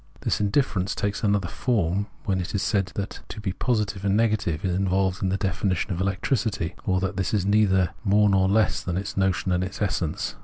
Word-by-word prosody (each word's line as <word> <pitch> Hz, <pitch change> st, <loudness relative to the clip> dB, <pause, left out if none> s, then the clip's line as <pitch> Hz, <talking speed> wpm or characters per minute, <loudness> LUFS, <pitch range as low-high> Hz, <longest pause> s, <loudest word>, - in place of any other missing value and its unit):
This -, -, 0 dB
indifference 100 Hz, -3 st, +1 dB
takes 100 Hz, +2 st, -2 dB
another 100 Hz, -3 st, +2 dB
form 100 Hz, -1 st, 0 dB, 0.2 s
when 95 Hz, -2 st, 0 dB
it 90 Hz, -, -5 dB
is 100 Hz, -, 0 dB
said 100 Hz, -4 st, +1 dB
that 100 Hz, -1 st, -4 dB
to 110 Hz, -, -7 dB
be 100 Hz, -3 st, -3 dB
positive 105 Hz, -4 st, -1 dB
and 100 Hz, 0 st, +2 dB
negative 105 Hz, -8 st, 0 dB
is 90 Hz, -, +1 dB
involved 95 Hz, 0 st, +1 dB
in 95 Hz, -, +1 dB
the 95 Hz, -, 0 dB
definition 95 Hz, -1 st, -1 dB
of 90 Hz, -, -3 dB
electricity, 95 Hz, -2 st, -1 dB
or 95 Hz, -1 st, +2 dB
that 95 Hz, +1 st, -2 dB
this 95 Hz, +2 st, 0 dB
is 100 Hz, -3 st, 0 dB
neither 95 Hz, -3 st, +3 dB
more 105 Hz, 0 st, +4 dB
nor 95 Hz, -1 st, +3 dB
less 110 Hz, +2 st, +2 dB
than 90 Hz, -1 st, -3 dB
its 100 Hz, +2 st, -4 dB
notion 95 Hz, -1 st, +1 dB
and 90 Hz, 0 st, +1 dB
its 95 Hz, 0 st, -6 dB
essence. 90 Hz, -6 st, -1 dB
95 Hz, 205 wpm, -25 LUFS, 95-105 Hz, 0.2 s, more